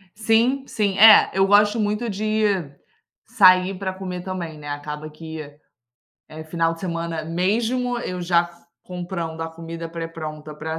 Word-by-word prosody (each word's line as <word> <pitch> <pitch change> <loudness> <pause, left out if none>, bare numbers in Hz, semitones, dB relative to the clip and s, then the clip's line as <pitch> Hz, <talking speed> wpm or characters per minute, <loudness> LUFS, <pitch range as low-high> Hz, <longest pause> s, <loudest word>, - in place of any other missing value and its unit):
Sim, 230 +5 +2
sim. 200 -2 -1
É, 220 -1 +9
eu 195 0 +3
gosto 210 +2 +4
muito 210 +2 -1
de 215 +2 -1 0.8
sair 185 -1 +5
pra 190 -1 -3
comer 185 -1 -6
também, 180 -4 -5
né, 145 0 -8
acaba 150 +1 -6
que, 160 +1 -8 0.9
eh, 155 +1 -9
final 165 +1 -1
de 165 - -15
semana, 170 -3 -4
mesmo 230 +9 0
eu 180 -5 -5
já 170 -1 +3
f 170 0 -16 0.2
comprando 175 -2 -6
a 165 - -4
comida 165 0 -8
pré-pronta 160 -2 -7
pra 160 +2 -5
180 Hz, 150 wpm, -22 LUFS, 165-205 Hz, 0.9 s, É